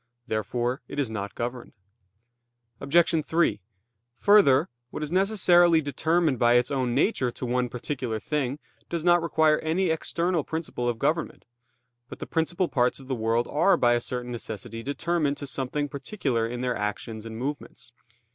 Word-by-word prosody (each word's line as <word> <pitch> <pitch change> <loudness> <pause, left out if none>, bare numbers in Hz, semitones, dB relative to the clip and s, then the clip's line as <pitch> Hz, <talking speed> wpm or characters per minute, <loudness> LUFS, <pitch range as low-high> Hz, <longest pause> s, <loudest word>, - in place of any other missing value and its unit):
Therefore 120 +4 -2
it - - -8
is 135 -6 -1
not 100 -2 -5
governed. 120 +1 -5 1.1
Obj. 165 +1 +2
3: 165 -10 +1 0.5
Further, 200 -8 +5 0.2
what 150 - -5
is 150 - -5
necessarily 175 -3 +4
determined 160 -1 0
by 120 0 +4
its 120 +2 +2
own 130 -3 0
nature 135 - +2
to 125 - -6
one 125 0 0
particular 125 -2 -4
thing, 140 0 -2 0.3
does 170 -2 -2
not 175 0 +5
require 160 -2 +3
any 165 +3 0
external 170 +1 0
principle 155 -7 -3
of 120 - -2
government. 160 +7 -1 0.6
But - - -8
the - - -6
principal 175 +3 0
parts 125 -3 +1
of 135 0 -14
the - - 0
world 115 0 0
are 180 +5 +3
by 120 -4 +4
a 120 - +1
certain 125 0 -4
necessity 115 -1 -6
determined 145 +2 -1
to 145 - -6
something 135 +2 -2
particular 135 - -2
in 120 +1 -5
their 125 -1 -1
actions 105 +2 -4
and 110 0 -7
movements. 125 -2 -6
135 Hz, 160 wpm, -26 LUFS, 120-165 Hz, 1.1 s, Further